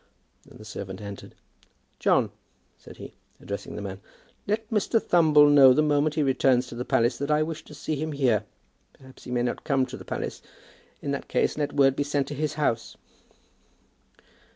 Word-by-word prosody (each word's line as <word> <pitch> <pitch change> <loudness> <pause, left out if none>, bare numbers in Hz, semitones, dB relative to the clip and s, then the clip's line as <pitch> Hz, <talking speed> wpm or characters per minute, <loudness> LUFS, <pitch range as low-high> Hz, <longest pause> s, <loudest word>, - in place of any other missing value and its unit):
Then - - -15
the 110 - -13
servant 95 -2 -7
entered. 100 -1 -9 0.6
"John," - - +2 0.4
said - - -15
he, - - -10 0.3
addressing 100 0 -6
the 105 - -6
man, 95 -1 -7 0.5
"let 215 +2 -1
Mr. 220 +1 +2
Thumble 155 -6 +5
know 140 -3 +7
the 155 - +3
moment 150 0 +1
he 155 - +1
returns 130 -2 +2
to - - -8
the 120 - -3
palace 120 0 +1
that 140 +1 -3
I 150 0 +3
wish 160 0 -5
to 150 - -12
see 155 +1 -3
him 155 +1 -3
here. 125 -7 +2 0.5
Perhaps 130 -1 -17
he - - -7
may 120 -1 0
not 120 - -3
come 135 -2 +1
to 130 +1 -8
the - - -11
palace. - - -5 0.6
In 140 - -2
that 140 - -4
case - - 0
let 145 -1 -2
word 135 -2 +4
be - - -2
sent 145 -1 -1
to - - -4
his 150 +1 -2
house." 120 -7 -1
140 Hz, 190 wpm, -26 LUFS, 125-150 Hz, 0.6 s, know